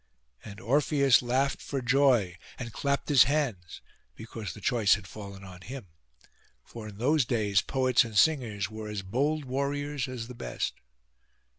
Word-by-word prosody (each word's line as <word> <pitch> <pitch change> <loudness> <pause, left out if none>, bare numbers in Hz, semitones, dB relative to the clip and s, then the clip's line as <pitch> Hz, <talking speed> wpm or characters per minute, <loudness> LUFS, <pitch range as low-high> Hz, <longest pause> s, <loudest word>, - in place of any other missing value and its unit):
And 100 -2 -10
Orpheus 140 +2 +3
laughed 130 +3 0
for 140 - -3
joy, 125 -7 +3 0.2
and 115 -3 -7
clapped 140 0 -1
his 140 -4 +7
hands, 125 - -2 0.3
because 110 -5 -7
the - - -10
choice 110 -2 +3
had 105 -3 -9
fallen 100 -1 -10
on 90 -1 -11
him; 125 +5 -8 0.8
for 115 -2 -10
in 105 -2 -10
those 145 +6 +2
days 105 -5 +1
poets 130 -2 +2
and 110 -3 -5
singers 115 -10 +2
were 110 0 -7
as 105 -2 -4
bold 140 +9 -1
warriors 140 +1 -2
as 125 -3 -6
the 125 - -9
best. - - -4
120 Hz, 155 wpm, -28 LUFS, 105-140 Hz, 0.8 s, his